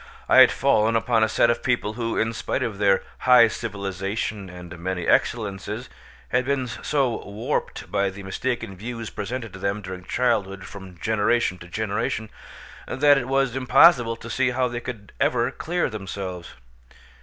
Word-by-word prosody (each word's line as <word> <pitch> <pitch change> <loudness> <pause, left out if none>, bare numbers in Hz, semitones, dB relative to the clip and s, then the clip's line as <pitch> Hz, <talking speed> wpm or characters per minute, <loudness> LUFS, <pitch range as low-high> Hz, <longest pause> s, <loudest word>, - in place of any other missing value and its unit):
I - - +4
had - - +9
fallen 110 +2 +2
upon 115 0 +2
a 110 - +2
set 115 +1 +3
of 120 - -2
people 120 -5 0
who, 115 0 -3
in 115 +1 0
spite - - -2
of 105 -4 -4
their 100 -2 +3 0.2
high 125 -2 +7
civilisation 100 -1 -4
and 90 -1 -10
many 90 0 -3
excellences, 105 +1 0 0.4
had 125 +2 +2
been 135 0 0
so 125 +2 -1
warped 110 +8 -4
by 100 0 +1
the 100 +1 -10
mistaken 115 +1 -3
views 115 +3 -6
presented 115 +2 -5
to 95 - -9
them 100 +2 -2
during 95 -1 -7
childhood 100 -6 0
from 95 -3 -11
generation 105 0 +1
to 85 - -11
generation, 105 +2 -2 0.6
that 145 +1 +4
it 125 - -5
was 135 -2 +1
impossible 125 -2 +5
to 115 - -11
see 130 -1 +2
how 125 +1 +1
they 120 -1 -4
could 115 -4 -8
ever - - +2
clear 175 +2 -1
themselves. 95 -4 -6
110 Hz, 165 wpm, -24 LUFS, 100-125 Hz, 0.6 s, had